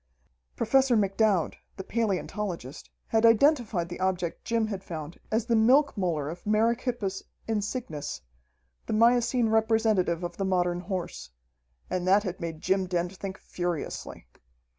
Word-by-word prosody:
Professor 255 +1 +3
McDowd, 200 -3 +2 0.2
the 190 - -5
palaeontologist, 195 - -3 0.2
had 225 0 +2
identified 230 - +4
the 175 - -7
object 185 -2 -1
Jim 230 -1 +1
had 200 -3 -5
found 160 -2 -7
as 220 0 +1
the 235 -1 +2
milk 260 +6 +4
molar 170 -8 -1
of 170 +3 -7
merychippus 225 -1 0 0.3
insignis, 205 - -3 0.7
the - - -2
miocene 240 +1 +3
representative 220 -6 +2
of 175 0 -5
the 195 - -1
modern 180 -2 +1
horse. 180 - -5 0.6
And 185 0 -2
that 200 +2 +5
had 185 -3 -4
made 165 -2 -5
Jim 190 0 +1
Dent 175 +1 -2
think 190 +1 -6
furiously. 175 -3 -5
195 Hz, 135 wpm, -28 LUFS, 175-225 Hz, 0.7 s, that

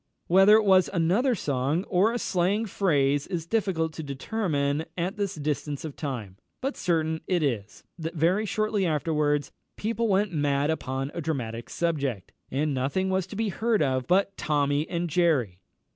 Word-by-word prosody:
Whether 195 +4 +6
it 220 -1 +4
was 190 -2 +5
another 200 +9 +2
song 145 +1 -1
or 195 +3 +2
a 240 - -1
slang 200 +1 0
phrase 145 -9 +1
is 170 -3 -3
difficult 170 -6 0
to 160 - -6
determine 145 0 -1
at 180 +4 -1
this 200 -2 -2
distance 150 0 -3
of 150 - -6
time; 115 -10 -5 0.2
but 270 +2 -2
certain 160 -2 0
it 175 -4 +1
is, 110 -7 -3 0.2
that 165 +1 -4
very 180 +7 +2
shortly 215 -1 0
afterwards 150 -3 0 0.3
people 230 +2 -1
went 200 -1 +1
mad 145 0 +1
upon 135 -2 -3
a 170 - -4
dramatic 120 -7 -4
subject, 140 - -2 0.2
and 145 +2 0
nothing 145 +9 0
was 190 -1 0
to 195 - -9
be 220 0 0
heard 220 0 +1
of 130 -2 0
but 195 +2 +2
"Tommy 145 0 0
and 175 -1 -1
Jerry." 145 - +1
160 Hz, 165 wpm, -27 LUFS, 145-195 Hz, 0.3 s, Whether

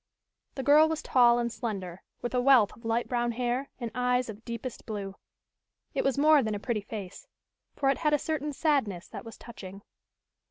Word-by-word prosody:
The 265 - -4
girl 300 +3 +6
was 320 -1 -3
tall 240 -2 +5
and 235 0 -1
slender, 195 -7 -5 0.2
with 240 - -3
a 250 - +2
wealth 250 -6 +5
of 230 +2 -17
light 230 +1 0
brown 240 -1 0
hair 250 +3 -2
and 235 -3 -4
eyes 250 0 +1
of 220 +1 -9
deepest 235 +1 -6
blue. 200 -3 -4 0.8
It - - 0
was 270 -1 +1
more 300 0 +6
than 220 -3 -2
a - - -4
pretty 220 0 -2
face, 200 -3 -8 0.5
for 275 - 0
it - - -3
had 305 -2 +2
a - - +2
certain 300 0 -2
sadness 270 - 0
that - - -8
was 225 -1 -10
touching. 200 -4 -10
240 Hz, 195 wpm, -28 LUFS, 215-270 Hz, 0.8 s, girl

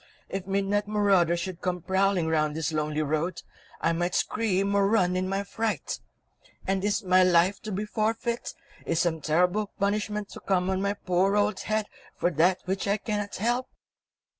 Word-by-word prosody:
If 195 -1 -4
midnight 200 +1 0
marauders 195 -5 +3
should 180 0 -5
come 180 -2 -2
prowling 190 -2 +2
round 155 -2 +1
this 160 0 -2
lonely 155 0 0
road, 155 +4 -2 0.4
I 165 - +2
might 175 +1 -1
scream 200 -3 +1
or 200 -1 +3
run 185 -4 +2
in 185 0 -1
my 195 +1 -1
fright! 220 +2 -3 0.7
And 190 0 0
is 205 0 0
my 185 0 +5
life 180 +2 +3
to 215 - -6
be 205 +2 -2
forfeit, 225 +3 -2 0.3
is 165 - 0
some 160 -2 0
terrible 180 +7 +2
punishment 210 +1 -1
to - - -9
come 185 -1 0
on 190 0 0
my 200 +1 0
poor 190 +1 +1
old 205 -1 +1
head 215 0 -1 0.3
for 175 - +1
that 180 +4 +3
which 190 +2 -2
I 200 +1 +2
cannot 205 -1 -3
help?" 240 +5 0
190 Hz, 175 wpm, -27 LUFS, 175-205 Hz, 0.7 s, my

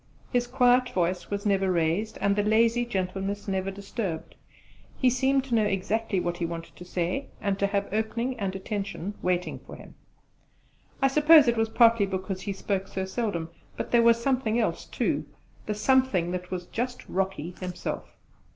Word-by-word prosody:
His 245 -1 +2
quiet 250 0 +4
voice 180 0 -1
was 200 0 -3
never 195 -2 +2
raised, 170 +5 0
and 200 0 +2
the 205 - +2
lazy 230 +3 +3
gentleness 195 -1 -3
never 190 0 -1
disturbed; 195 -3 -5 0.6
he 255 -2 +3
seemed 265 +2 +2
to 265 -3 -5
know 220 -2 +4
exactly 200 +1 0
what 175 -1 -2
he 175 - -3
wanted 165 0 -7
to 180 - -10
say, 180 +10 -2
and 200 -2 -1
to 200 - +2
have 200 0 -1
opening 230 +4 -1
and 195 -2 -2
attention 200 0 -4
waiting 180 0 -1
for - - -11
him. - - -13 1.1
I - - +7
suppose 300 +1 +7
it 235 - +3
was 225 -1 +1
partly 230 -3 +5
because 190 0 -4
he 200 - -3
spoke 195 0 -2
so 190 -1 -3
seldom: 190 -5 -2 0.3
but - - -4
there 235 - +5
was 230 0 +5
something 240 -3 +1
else 230 - 0
too - - -1 0.4
the 210 - -1
something 210 -7 +2
that 180 0 -4
was 180 -1 -4
just 245 +6 -4
Rocky 185 -3 -2
himself. 180 -1 -5
200 Hz, 175 wpm, -27 LUFS, 185-235 Hz, 1.1 s, I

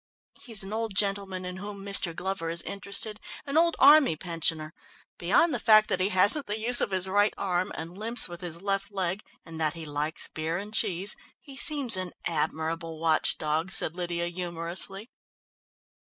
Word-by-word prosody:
"He's 225 -6 -1
an 195 +2 -7
old 220 -2 -3
gentleman 195 -2 0
in 180 0 -6
whom 200 0 -8
Mr. 195 -4 +1
Glover 190 -3 -4
is 170 0 -2
interested, 200 +2 -4 0.3
an 280 0 -4
old 335 +1 +3
army 285 - +6
pensioner. 165 -2 -2 0.5
Beyond 220 - +2
the 245 - -2
fact 215 -1 +5
that 185 - 0
he 185 +2 +1
hasn't 205 +10 +4
the 210 +1 -2
use 240 +2 +6
of - - 0
his 190 -1 +2
right 205 +2 +1
arm, 185 +1 -2
and 165 +2 -7
limps 225 +4 0
with 175 0 -10
his 170 0 -3
left 195 0 -2
leg, 190 0 -2 0.2
and 165 -1 -8
that 155 0 0
he 165 -1 -7
likes 150 +2 -3
beer 160 +2 -3
and 205 +3 -8
cheese, 195 -2 0 0.2
he 275 -2 -11
seems 280 - +6
an 185 -1 -4
admirable 160 0 -3
watch 160 -1 +1
dog," 155 +4 -2
said 160 - +1
Lydia 175 -1 -3
humorously. 175 +4 -4
185 Hz, 180 wpm, -27 LUFS, 170-210 Hz, 0.5 s, army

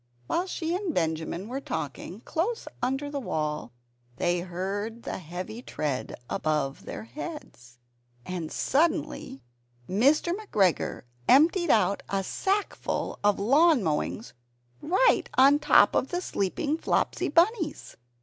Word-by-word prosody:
While 355 - -1
she 335 -2 -2
and 370 -4 -2
Benjamin 165 +3 -1
were 260 +4 -4
talking, - - -5
close 410 +8 -2
under 270 +3 -1
the 285 - -2
wall, 150 - -3 0.4
they 175 +6 +1
heard 195 +6 -4
a - - -4
heavy 185 +7 -7
tread 145 - -3
above 150 -3 -1
their - - -6
heads; 225 - -9 0.5
and 175 -4 -4
suddenly 290 - 0 0.4
Mr. 280 - +3
McGregor 210 - 0 0.3
emptied 330 +5 +5
out 200 -4 +3
a 195 -1 0
sackful 395 - -2
of 205 -1 +3
lawn 280 +4 +4
mowings 160 +7 -2 0.5
right 380 +10 +3
upon 270 +2 +7
the 290 - +2
top - - +5
of - - +1
the 355 - -2
sleeping 290 - -1
Flopsy - - 0
Bunnies! 335 0 +1
235 Hz, 125 wpm, -27 LUFS, -, 0.5 s, upon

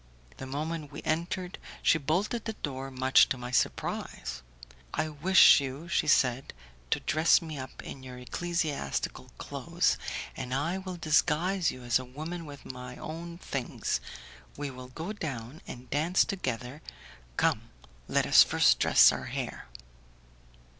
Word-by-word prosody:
The 130 - -7
moment 150 +2 -4
we 145 - -8
entered 175 +3 -2 0.2
she 165 - +4
bolted 190 - -1
the 220 - -2
door, 135 -2 -3
much 130 0 +4
to 130 - -1
my 125 0 -6
surprise. 125 - -2 0.5
"I 155 +1 0
wish 155 +3 +7
you," 140 +4 -5
she - - +1
said, 125 - +2 0.3
"to - - +1
dress 155 +2 +4
me 155 -4 -7
up 130 0 -8
in 135 - -8
your 130 -1 -9
ecclesiastical 150 - -3
clothes, - - 0 0.4
and 130 -1 -3
I 165 +7 -1
will 185 -1 -6
disguise 165 +3 +2
you 130 - -7
as 120 +1 +2
a - - -6
woman 155 +6 -6
with 140 -1 -11
my 125 -1 -8
own 170 +2 -7
things. 135 -7 -3 0.6
We 145 -1 -4
will 130 0 -9
go 160 +10 -6
down 135 - -6
and 125 0 -9
dance 160 +6 +3
together. 130 - -4 0.6
Come, - - +1 0.4
let - - +2
us - - +8
first - - +4
dress - - +7
our - - -4
hair." - - -5
145 Hz, 145 wpm, -29 LUFS, 130-170 Hz, 0.6 s, us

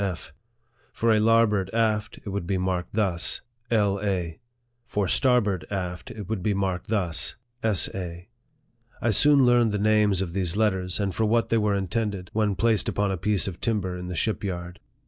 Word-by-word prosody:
F." 85 -5 -4 0.6
For 115 -1 +2
lar 115 +1 +5
board 100 -4 -1
aft, 110 -2 0
it - - -4
would 100 -3 -4
be 95 - 0
marked 90 0 -2
thus 90 -7 -1
" 120 0 -45
L. 100 -3 +2
A." 90 -5 -2 0.4
For 105 -5 -2
starboard 105 - +2
aft, 90 -3 -4
it 105 -4 -8
would 110 -3 -3
be 105 +1 0
marked 95 -2 -2
thus 85 - -2
" 120 +1 -47
S. 110 -5 +3
A." 90 -1 -6 0.7
1 120 -1 +2
soon 140 +5 +6
learned 120 -2 +4
the 105 - -1
names 105 -2 +3
of 90 -3 -3
these 95 -1 -1
letters, 95 -4 0
and 100 -2 -1
for 110 - 0
what 115 +2 +1
they 115 - +3
were 105 -1 +1
intended 100 0 -2
when 105 -2 +1
placed 115 -1 +2
upon 100 -1 0
a - - 0
piece 100 +3 +1
of 90 -3 -6
tim 115 -2 +1
ber 95 -2 -4
in 90 0 -6
the 90 - -5
ship 110 +6 -1
yard. 90 -2 -5
100 Hz, 200 wpm, -25 LUFS, 90-110 Hz, 0.7 s, soon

